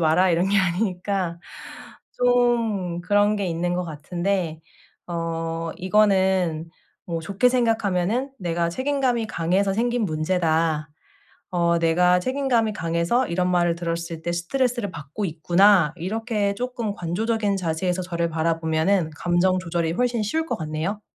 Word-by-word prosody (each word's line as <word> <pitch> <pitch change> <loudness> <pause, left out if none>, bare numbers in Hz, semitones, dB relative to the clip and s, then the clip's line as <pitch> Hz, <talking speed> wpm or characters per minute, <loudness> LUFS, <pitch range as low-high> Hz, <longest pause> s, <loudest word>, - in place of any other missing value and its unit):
마라." 170 +3 +3
이런 175 +3 +2
게 200 0 +3
아니니까 185 -1 -1 0.8
좀 235 -8 +1
그런 205 +2 +3
게 200 -2 -2
있는 175 +1 -1
것 180 0 -1
같은데 170 +1 -2 0.5
어 165 -1 -3
이거는 190 -4 +2 0.4
뭐 165 -2 -3
좋게 200 +8 +2
생각하면은 225 0 +1
'내가 170 -1 0
책임감이 260 0 0
강해서 190 +3 +1
생긴 240 +1 0
문제다. 160 -2 0 0.6
어 170 -1 +2
내가 180 +2 +3
책임감이 255 -2 +1
강해서 170 +10 0
이런 180 +1 0
말을 175 -1 +2
들었을 170 -1 -4
때 170 +1 -2
스트레스를 240 +5 -1
받고 155 +5 -6
있구나.' 175 +1 +4
이렇게 210 +2 -1
쪼끔 235 -2 -3
관조적인 205 +4 -1
자세에서 180 +2 -1
저를 170 -2 -2
바라보면은 160 +2 +1
감정 175 +2 +2
조절이 170 -2 -1
훨씬 240 +3 0
쉬울 320 +10 -1
것 - - -2
같네요. 160 +6 -3
180 Hz, 300 characters per minute, -23 LUFS, 165-210 Hz, 0.8 s, 있구나